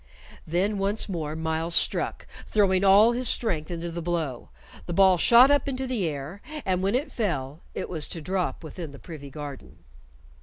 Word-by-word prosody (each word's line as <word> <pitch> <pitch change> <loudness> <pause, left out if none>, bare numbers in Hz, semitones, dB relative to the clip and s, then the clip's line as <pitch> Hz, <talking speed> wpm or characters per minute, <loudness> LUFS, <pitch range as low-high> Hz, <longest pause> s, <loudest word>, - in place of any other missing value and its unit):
Then 195 +5 0
once 200 +2 0
more 160 -6 -4
Myles 160 +1 -1
struck, - - +2 0.2
throwing 195 -3 +2
all 200 +4 +6
his 245 0 0
strength 165 -10 -1
into 170 -1 -4
the 170 +1 -5
blow. 160 -7 -3 0.4
The 175 - -3
ball 190 -1 +5
shot 245 +8 +7
up 285 -1 +2
into 265 0 -3
the 240 -9 -1
air, 150 +6 -6 0.2
and 185 -1 0
when 195 +4 +1
it 280 +5 -1
fell, 150 - -2 0.2
it - - -3
was 160 -4 -2
to 165 - -5
drop 180 +2 -2
within 155 -1 -8
the - - -10
privy 145 -2 -10
garden. 145 -1 -9
175 Hz, 180 wpm, -26 LUFS, 160-205 Hz, 0.4 s, shot